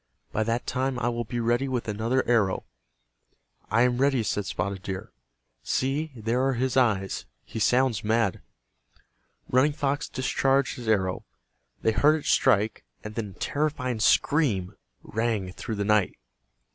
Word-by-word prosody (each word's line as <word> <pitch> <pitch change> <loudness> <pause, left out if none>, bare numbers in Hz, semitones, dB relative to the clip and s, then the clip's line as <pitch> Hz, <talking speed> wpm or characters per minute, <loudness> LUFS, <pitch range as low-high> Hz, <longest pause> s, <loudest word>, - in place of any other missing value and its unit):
By 110 - -1
that 115 +2 -1
time 130 0 -1
I 120 -1 0
will 120 0 -3
be 120 +2 -4
ready 120 +3 +1
with 125 -3 -2
another 115 +5 0
arrow." 110 -6 +2 1.0
"I 115 +4 +4
am 125 0 +1
ready," 135 -3 +3
said 105 -2 -2
Spotted 100 -1 -3
Deer. 95 -2 -6 0.5
"See, 145 +4 -1
there 115 +3 0
are 135 0 +2
his 130 +1 -1
eyes. 105 -7 +1 0.2
He - - -6
sounds 125 0 +2
mad." 110 -3 +1 1.1
Running 130 +4 +3
Fox 145 +1 -1
discharged 135 +1 +1
his 120 -2 -8
arrow. 95 -4 +1 0.6
They 110 - +4
heard 145 +8 +4
it - - -15
strike, 105 +1 +2 0.2
and 105 - -7
then 105 -3 -4
a - - -23
terrifying 140 -5 -1
scream 105 - +2 0.3
rang 110 -4 -1
through 110 +4 -5
the 100 0 -2
night. 105 -2 +2
120 Hz, 150 wpm, -26 LUFS, 105-130 Hz, 1.1 s, I